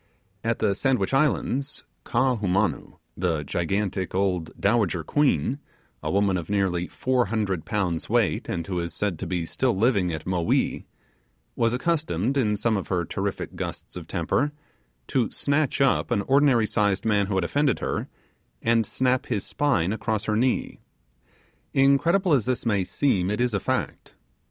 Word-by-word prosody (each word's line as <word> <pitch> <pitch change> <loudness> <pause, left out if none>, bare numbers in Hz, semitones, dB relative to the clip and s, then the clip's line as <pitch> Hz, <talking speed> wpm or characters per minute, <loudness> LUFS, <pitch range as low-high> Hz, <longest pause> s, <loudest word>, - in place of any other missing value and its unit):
At 115 0 0
the 105 -2 +1
Sandwich 125 0 0
Islands, 140 0 0 0.2
Kaahumanu, 110 -7 0 0.2
the 85 -4 -1
gigantic 95 +4 -2
old 90 -4 0
dowager 100 -6 +1
queen 135 - +1 0.4
a - - -3
woman 100 -1 +2
of 85 0 -6
nearly 95 -4 0
four 125 -3 0
hundred 100 -6 -1
pounds 95 -6 -1
weight, - - +1
and 85 -1 -2
who 90 -1 -2
is 85 -1 -4
said 95 -4 -1
to 95 - -4
be 90 -2 -2
still 120 +5 0
living 100 -5 +2
at 80 -1 -5
Mowee 90 -2 0 0.7
was 115 -1 +2
accustomed, 135 - 0
in 105 -6 +1
some 110 +1 +1
of 95 - -4
her 90 -2 0
terrific 95 +3 -4
gusts - - -6
of - - -7
temper, 145 +1 0 0.5
to 125 -5 0
snatch 145 0 0
up 135 - +2
an 100 - +1
ordinary 135 -2 +4
sized 105 -2 0
man 105 -3 +2
who 100 - -2
had 95 - +1
offended 140 +7 +1
her, - - -3 0.6
and 115 -2 +2
snap 130 0 0
his 105 -6 -1
spine 105 - +1
across 110 -2 -2
her 105 - 0
knee. 125 +3 0 1.0
Incredible 160 +7 +4
as 130 -7 +3
this 125 -1 -1
may 100 -4 +2
seem, 95 -3 +1
it 105 - -1
is 120 -2 +1
a 100 - +1
fact. - - -3
105 Hz, 160 wpm, -25 LUFS, 95-130 Hz, 1.0 s, ordinary